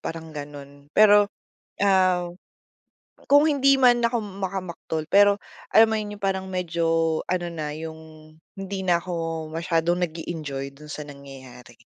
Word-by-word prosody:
parang 160 -1 -7
ganun. 145 -1 -10
Pero, 205 -1 +6 0.5
ah, 185 -3 +3 1.0
kung 285 +1 +6
hindi 275 -2 +4
man 240 -2 +5
ako 235 0 +1
makamaktol 185 -5 -5
pero 205 0 +5 0.3
alam 220 0 +7
mo 220 - 0
'yon, 210 -1 -4
yung 205 - -15
parang 190 -1 -2
medyo 170 -2 -2 0.4
ano 175 -1 -2
na, 155 -3 -5
yung 160 +1 -7 0.6
hindi 195 0 -5
na 175 -2 +2
ako 165 -2 -4
masyadong 170 +1 0
nag-e-enjoy 150 -5 -6
dun 150 +1 -13
sa - - -6
nangyayari. 130 -4 -13
175 Hz, 135 wpm, -24 LUFS, 155-200 Hz, 1.0 s, alam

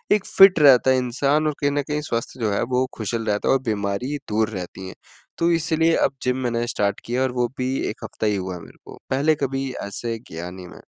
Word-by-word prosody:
एक 210 - -2
फिट 195 -3 +6
रहता 130 -3 +6
है 130 - +3
इंसान 140 +5 +1
और 150 - -1
कहीं 145 - +2
न 145 0 0
कहीं 150 0 -1
स्वास्थ्य 115 +2 -3
जो 110 -2 +1
है - - 0
वो 130 +1 +2
खुशहाल 115 +1 -3
रहता 105 -1 0
है - - +5
और 135 - +1
बीमारी 105 +7 -2
दूर 110 +1 +1
रहती 95 -1 -7
है, - - -9 0.4
तो 170 +1 +2
इसीलिए 165 0 +2
अब 135 - -15
जिम 125 0 0
मैंने 120 -1 -1
स्टार्ट 100 -3 -1
किया 120 +2 -1
है 130 - +3
और 125 - -6
वो 120 - +2
भी 130 +1 -1
1 - - -8
हफ्ता 110 - -3
ही 105 - +1
हुआ 95 -1 -4
है 85 - -9
मेरे - - -15
को, - - -11
पहले 145 +4 +3
कभी 135 -1 -2 0.2
ऐसे 115 +3 -4
गया 85 +2 -6
नहीं 90 -1 -10
मैं। - - -14
125 Hz, 245 wpm, -22 LUFS, 105-145 Hz, 0.4 s, फिट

